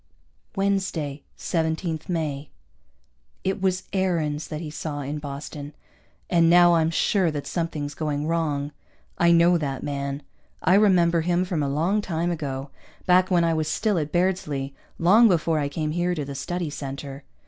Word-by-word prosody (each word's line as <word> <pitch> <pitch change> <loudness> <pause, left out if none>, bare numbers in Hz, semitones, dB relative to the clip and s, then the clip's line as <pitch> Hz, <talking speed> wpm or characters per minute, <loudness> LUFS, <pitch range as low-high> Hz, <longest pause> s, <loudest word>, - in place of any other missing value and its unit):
Wednesday, 190 -8 -1
17 160 -1 -1
May. 150 -5 -3 0.9
It 190 +1 -1
was 185 -1 +1
Aarons 165 -6 0
that 155 - -5
he 155 -2 -6
saw 150 -1 -4
in 145 +2 -4
Boston, 145 +1 -7 0.5
and 170 -2 +4
now 175 0 +7
I'm 165 -1 +3
sure 180 +2 +2
that 145 -2 -4
something's 155 -4 -3
going 150 0 -2
wrong. 150 -3 -1 0.5
I 170 0 +5
know 170 +1 +5
that 135 -4 -3
man. 140 0 -3 0.4
I 180 - +4
remember 180 -5 +4
him 175 +2 +1
from 175 -4 -1
a 140 - 0
long 170 +9 +1
time 175 -2 -1
ago, 140 -4 -4 0.3
back 185 0 +4
when 175 -2 +3
I 165 -1 +2
was 155 -1 -1
still 205 +3 +1
at 150 -1 -3
Bairdsley, 165 -7 -1 0.2
long 210 +8 +6
before 165 -4 +2
I 145 -1 -1
came 155 +1 -2
here 175 +2 0
to 150 -3 -3
the 140 - -6
Study 170 +3 -3
Center. 140 0 -6
160 Hz, 160 wpm, -24 LUFS, 145-175 Hz, 0.9 s, now